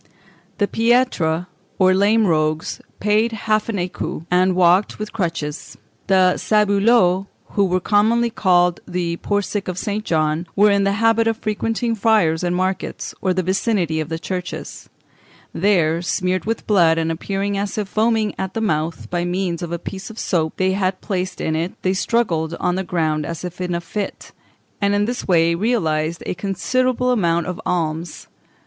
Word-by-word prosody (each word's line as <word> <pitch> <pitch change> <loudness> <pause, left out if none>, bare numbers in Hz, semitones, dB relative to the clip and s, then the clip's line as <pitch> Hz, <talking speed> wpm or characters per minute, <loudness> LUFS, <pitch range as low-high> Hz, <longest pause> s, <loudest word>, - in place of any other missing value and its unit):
The 205 - +1
piètres, 225 -9 +1 0.3
or 185 -1 +4
lame 210 +3 +3
rogues, 155 -2 0 0.2
paid 215 +3 +2
half 215 0 0
an 225 - -1
écu, 175 -3 -4
and 185 +1 +3
walked 180 +2 +3
with 215 0 -6
crutches. 165 -6 -4 0.3
The 185 -2 +4
sabouleux, 200 -2 +3 0.2
who 200 - +2
were 185 0 +1
commonly 225 +5 +2
called 180 -4 +2
the 175 -1 -2
poor 205 +2 -1
sick 205 0 -4
of 180 -1 -3
St. 210 +2 -2
John, 155 -1 0
were 205 +1 +5
in 200 0 +2
the 200 - +2
habit 225 +2 +3
of 225 -1 +1
frequenting 225 +2 -1
fairs 200 -7 +2
and 175 0 0
markets, 185 +1 -2
or 185 - +1
the 185 0 0
vicinity 185 -3 0
of 155 0 -3
churches; 180 -2 -6 0.6
there, 170 -4 +2
smeared 180 +1 -1
with 225 +1 -2
blood 170 -6 +4
and 165 0 0
appearing 195 +4 -2
as 200 +1 -3
if 210 -2 -1
foaming 220 0 +1
at 190 -1 -4
the - - 0
mouth 160 -6 -1
by 175 -1 0
means 175 -1 -2
of 170 -1 -5
a 170 - -1
piece 190 +4 -7
of 225 - -11
soap 160 -7 -1
they 190 0 +2
had 190 -1 -1
placed 185 -2 -3
in 160 - -1
it, 165 +4 -3
they 185 - +2
struggled 175 -6 0
on 180 - 0
the 190 +1 -1
ground 155 -4 -1
as 170 +3 -5
if 180 +1 -7
in 180 -1 -1
a - - 0
fit, 195 +4 -5 0.5
and 200 0 +2
in 205 0 +2
this 245 +2 -4
way 170 -2 +4
realised 170 -6 0
a - - -2
considerable 250 +7 0
amount 170 -7 +1
of 180 -1 -5
alms. 165 -1 -2
185 Hz, 175 wpm, -20 LUFS, 170-210 Hz, 0.6 s, were